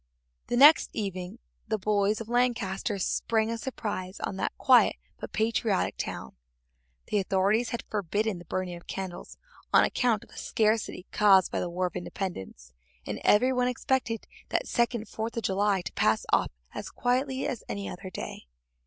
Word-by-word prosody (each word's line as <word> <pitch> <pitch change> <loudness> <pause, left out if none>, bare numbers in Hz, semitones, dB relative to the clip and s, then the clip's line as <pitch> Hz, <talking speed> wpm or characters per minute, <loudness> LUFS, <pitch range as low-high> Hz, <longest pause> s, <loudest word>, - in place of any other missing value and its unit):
The 240 - 0
next 295 +5 +8
evening 190 -1 -4 0.3
the 220 0 0
boys 205 +1 +1
of 225 - -6
Lancaster 235 -4 0
sprang 220 +3 0
a 230 - -2
surprise 205 -6 -4
on - - -3
that - - -2
quiet 255 -3 +5 0.2
but - - -7
patriotic 220 -2 0
town. 65 - -5 0.7
The 210 - +2
authorities 200 +4 +2
had 235 - -4
forbidden 205 0 -1
the 175 - -12
burning 180 +1 -3
of 170 - -13
candles 185 -2 -6 0.3
on - - +6
account 235 -5 +1
of - - -19
the - - -14
scarcity 215 -4 0
caused 195 -3 +5
by - - -1
the 175 - -2
War 180 +2 -1
of 180 - -4
Independence, 95 - -6 0.3
and - - -4
every 250 +5 +4
one 250 -1 +2
expected 250 -2 -1 0.2
that - - 0
second 235 -2 0
Fourth 225 +3 -5
of 230 - -1
July 195 0 +1
to - - -6
pass 110 0 +2
off - - +4 0.2
as - - -6
quietly 260 +2 0
as 255 -7 -3
any 200 0 -3
other 185 +1 -7
day. 115 - -7
210 Hz, 170 wpm, -28 LUFS, 185-230 Hz, 0.7 s, next